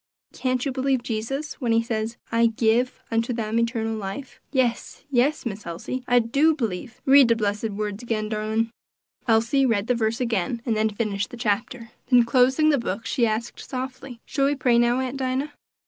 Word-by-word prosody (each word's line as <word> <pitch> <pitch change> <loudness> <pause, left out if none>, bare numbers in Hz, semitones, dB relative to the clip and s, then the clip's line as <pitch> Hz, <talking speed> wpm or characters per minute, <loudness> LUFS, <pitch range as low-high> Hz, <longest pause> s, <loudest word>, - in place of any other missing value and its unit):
Can't 255 0 -1
you 275 - 0
believe 260 -1 0
Jesus 270 +8 -4
when 235 -3 +1
he 230 0 +3
says, 225 0 -3
'I 230 0 +4
give 230 +2 +1
unto 230 +2 0
them 225 -1 -1
eternal 230 -1 -1
life'?" 215 +6 -7
"Yes, 255 -4 -1
yes, 275 +4 +2
Miss 215 -2 -4
Elsie! 175 +10 -5
I 245 - +4
do 280 +7 +3
b'lieve; 230 -2 -4
read 275 -1 +7
de 230 - +4
blessed 210 0 -1
words 210 0 -4
again, 225 -3 -2
darlin'." 220 +1 -1 0.6
Elsie 230 +4 +3
read 225 -6 +2
the 250 - +2
verse 230 -1 0
again, 230 -2 -1
and 230 -3 +1
then 215 0 +2
finished 205 -1 -2
the 245 - -9
Chapter. 230 +2 -2 0.2
Then 245 -2 +6
closing 260 +5 +3
the 285 - +2
book, 230 -1 -4
she 240 -4 +1
asked 225 +2 -3
softly, 260 -1 -6
"Shall 275 -2 0
we 290 - +1
pray, 245 -3 +3
now, 240 +1 +3
Aunt 260 +1 -3
Dinah?" 265 +2 -1
235 Hz, 185 wpm, -24 LUFS, 220-255 Hz, 0.6 s, read